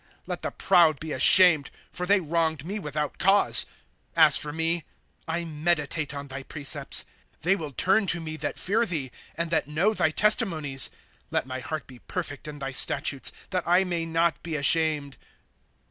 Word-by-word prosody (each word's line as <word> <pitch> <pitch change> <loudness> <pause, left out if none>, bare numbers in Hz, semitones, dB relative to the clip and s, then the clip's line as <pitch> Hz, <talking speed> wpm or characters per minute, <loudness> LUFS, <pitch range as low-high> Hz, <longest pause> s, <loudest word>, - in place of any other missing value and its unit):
' - - -36
Let - - -5
the - - -3
proud 170 -6 +3
be 160 0 -6
ashamed, 160 +1 +6 0.2
for 180 +1 -4
they 205 +1 +4
wronged 160 -3 -1
me 200 +4 -4
without 150 -3 -4
cause; 195 +2 +4 0.5
As 155 -3 +6
for 150 - +1
me, 165 +2 -1 0.4
I 170 +1 -3
meditate 155 -1 -2
on 140 0 -7
thy 135 0 -7
precepts. 140 +1 -1 0.2
' - - -37
They 180 +4 +3
will 160 -6 -6
turn 195 - +1
to 175 - +2
me 155 -1 -6
that - - -4
fear 220 +5 +1
thee. 145 -8 -4 0.2
And 170 0 -3
that 160 - 0
know 170 +9 +1
thy 155 - +1
testimonies. 155 -7 +1 0.2
' - - -35
Let - - -1
my 130 0 -6
heart 155 +4 -5
be 125 -2 -14
perfect 150 -3 -6
in 150 -1 -7
thy 135 -1 -5
statutes, 135 +1 0 0.2
That 185 -2 -2
I 180 +2 +4
may 170 -3 -3
not 165 -1 0
be 165 -2 -5
ashamed. 150 -1 +3
160 Hz, 185 wpm, -26 LUFS, 145-175 Hz, 0.5 s, ashamed